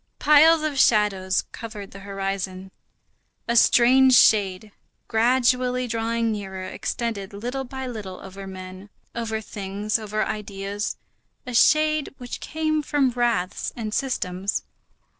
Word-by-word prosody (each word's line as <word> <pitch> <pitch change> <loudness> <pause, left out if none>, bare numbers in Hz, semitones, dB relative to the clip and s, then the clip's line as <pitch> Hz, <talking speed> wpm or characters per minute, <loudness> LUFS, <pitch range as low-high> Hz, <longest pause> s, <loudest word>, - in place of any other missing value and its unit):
Piles 305 +2 +6
of 295 -3 -1
shadows 200 -5 +3
covered 215 -4 -8
the 195 - -10
horizon. 195 -1 -4 0.8
A 235 - 0
strange 255 +3 +6
shade, 205 -2 +4 0.4
gradually 250 +2 +2
drawing 230 0 -1
nearer, 190 -3 -5
extended 205 0 -4
little 245 +6 -4
by 265 +1 -6
little 210 -7 -7
over 195 0 -9
men, 185 +1 -9 0.2
over 225 -2 -3
things, 205 +1 -3
over 215 0 -2
ideas; 205 -1 -4 0.5
a 250 - -6
shade 305 +3 +3
which 245 -2 -7
came 310 -1 -1
from 280 -3 +1
wraths 235 -6 -1
and 215 -3 -5
systems. 195 -8 -2
220 Hz, 120 wpm, -24 LUFS, 195-250 Hz, 0.8 s, Piles